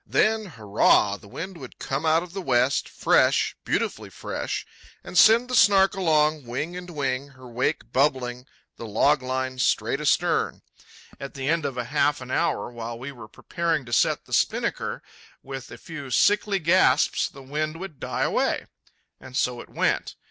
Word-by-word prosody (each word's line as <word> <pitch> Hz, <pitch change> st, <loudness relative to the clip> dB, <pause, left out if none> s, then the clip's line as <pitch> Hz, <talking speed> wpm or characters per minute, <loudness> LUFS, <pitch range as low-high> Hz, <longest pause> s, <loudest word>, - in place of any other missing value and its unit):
Then—hurrah!—the 110 Hz, -, +2 dB
wind 175 Hz, -, -7 dB
would 130 Hz, -3 st, -11 dB
come 140 Hz, +4 st, -3 dB
out 160 Hz, +2 st, +3 dB
of 180 Hz, -1 st, -12 dB
the 195 Hz, -, -4 dB
west, 130 Hz, -3 st, +1 dB
fresh, -, -, +2 dB
beautifully -, -, -2 dB
fresh, -, -, -4 dB, 0.4 s
and -, -, -9 dB
send 225 Hz, +6 st, +6 dB
the 250 Hz, -, -6 dB
Snark 195 Hz, -5 st, +5 dB
along, 155 Hz, -6 st, +1 dB
wing 145 Hz, +9 st, -4 dB
and 180 Hz, 0 st, -7 dB
wing, 140 Hz, -4 st, -2 dB
her 130 Hz, -2 st, -15 dB
wake 125 Hz, +6 st, -2 dB
bubbling, 130 Hz, -2 st, 0 dB, 0.3 s
the 115 Hz, -, -7 dB
log 140 Hz, +7 st, +2 dB
line 130 Hz, 0 st, -3 dB
straight -, -, +1 dB
astern. -, -, +1 dB, 0.6 s
At 140 Hz, +1 st, -8 dB
the 135 Hz, -1 st, -4 dB
end 160 Hz, 0 st, +1 dB
of 135 Hz, -, -3 dB
half 145 Hz, +4 st, 0 dB
an 125 Hz, 0 st, -8 dB
hour, -, -, 0 dB
while 115 Hz, -1 st, -6 dB
we 130 Hz, +4 st, -7 dB
were 120 Hz, -5 st, -11 dB
preparing 165 Hz, +5 st, -2 dB
to 120 Hz, -, -7 dB
set -, -, +2 dB
the -, -, -11 dB
spinnaker, -, -, 0 dB, 0.4 s
with 135 Hz, -1 st, -7 dB
a 120 Hz, -, -10 dB
few 145 Hz, 0 st, -8 dB
sickly 205 Hz, -, +3 dB
gasps 180 Hz, +1 st, +3 dB
the 135 Hz, -1 st, -13 dB
wind 155 Hz, +4 st, -3 dB
would 175 Hz, -7 st, -8 dB
die -, -, -2 dB
away. -, -, 0 dB, 0.5 s
And 130 Hz, 0 st, -8 dB
so 125 Hz, -1 st, 0 dB
it -, -, -14 dB
went. -, -, -1 dB
140 Hz, 165 wpm, -25 LUFS, 125-165 Hz, 0.6 s, send